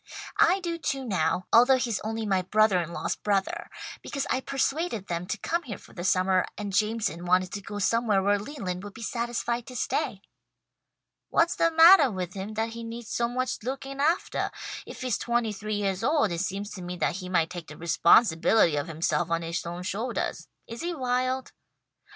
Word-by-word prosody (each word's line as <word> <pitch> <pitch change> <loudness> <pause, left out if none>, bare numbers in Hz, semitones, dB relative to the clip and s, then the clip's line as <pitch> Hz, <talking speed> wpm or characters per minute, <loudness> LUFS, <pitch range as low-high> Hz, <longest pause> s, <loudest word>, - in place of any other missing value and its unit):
I 365 +3 +5
do 340 -1 -3
too, 270 -4 -2
now, 180 -4 0
although 250 +3 +7
he's 240 -4 -1
only 225 +1 -3
my 190 -3 +2
brother 195 0 +3
in 170 0 -6
law's 170 - -2
brother, 200 -2 -1 0.3
because 280 -2 -3
I 260 - +1
persuaded 275 - -1
them 175 0 -3
to 220 - -2
come 340 - -1
here 235 - -7
for - - -17
the 175 - -6
summer, 185 0 +2
and 205 -2 -4
Jameson 210 -5 0
wanted 180 +1 +2
to 200 - -5
go 205 +1 -7
somewhere 210 -1 +2
where 205 +1 +3
Leland 195 -7 -5
would 205 -1 -9
be 230 - -8
satisfied 235 0 -2
to 255 - -9
stay." 235 -6 -2 1.1
"What's 335 +1 +2
the 335 - +3
mattah 325 -2 +8
with 180 -2 -4
him, 200 +2 -6
that 225 +1 0
he 230 +1 -7
needs 230 0 -7
so 235 - +1
much 255 +1 -2
looking 270 +3 -5
aftah? 325 +6 +1 0.4
If - - -9
he's 255 -5 -1
twenty 235 -2 0
three 215 +1 -4
yeahs 195 0 -1
old 285 - +2
it 170 0 -1
seems 200 +2 -3
to 185 - -7
me 180 0 -5
that 170 - 0
he 185 -2 -7
might 165 -3 +1
take 175 -3 -7
the 150 - -10
responsibility 170 0 +4
of 145 - -2
himself 165 +1 0
on 165 0 0
his 165 +1 -3
own 175 +1 -5
shouldahs. 225 +6 -3 0.2
Is 230 +1 -8
he 345 0 -2
wild?" 255 -1 -1
215 Hz, 195 wpm, -27 LUFS, 185-255 Hz, 1.1 s, mattah